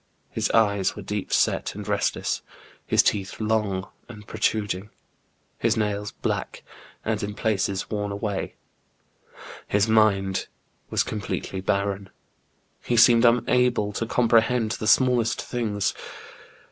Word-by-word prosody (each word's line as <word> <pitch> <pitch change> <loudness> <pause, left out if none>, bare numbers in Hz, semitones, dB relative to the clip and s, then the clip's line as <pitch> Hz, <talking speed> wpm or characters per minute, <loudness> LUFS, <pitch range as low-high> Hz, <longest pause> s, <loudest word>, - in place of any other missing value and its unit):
His - - -1
eyes 100 -4 +2
were 105 - -8
deep 105 0 -4
set - - +1
and - - -7
restless; - - -1 0.5
his - - +4
teeth 100 -2 -1
long 105 -3 0 0.2
and 105 -3 -11
protruding; 105 -2 -1 0.7
his 115 0 +1
nails 105 -1 -1
black, - - -4 0.4
and 110 -1 -1
in 105 -1 -4
places 100 -3 -1
worn 105 -1 -2
away; 100 -1 -3 1.1
his 100 +2 +2
mind 100 -3 +2 0.4
was - - +1
com 105 - -4
pletely 95 -2 -4
barren; 100 0 -1 0.7
he 120 - 0
seemed 120 +1 +7
unable 120 -2 +2
to 115 +2 -3
comprehend 115 -1 +2
the 110 - -3
smallest 125 -2 +3
things. 105 -5 -1
105 Hz, 120 wpm, -25 LUFS, 100-115 Hz, 1.1 s, seemed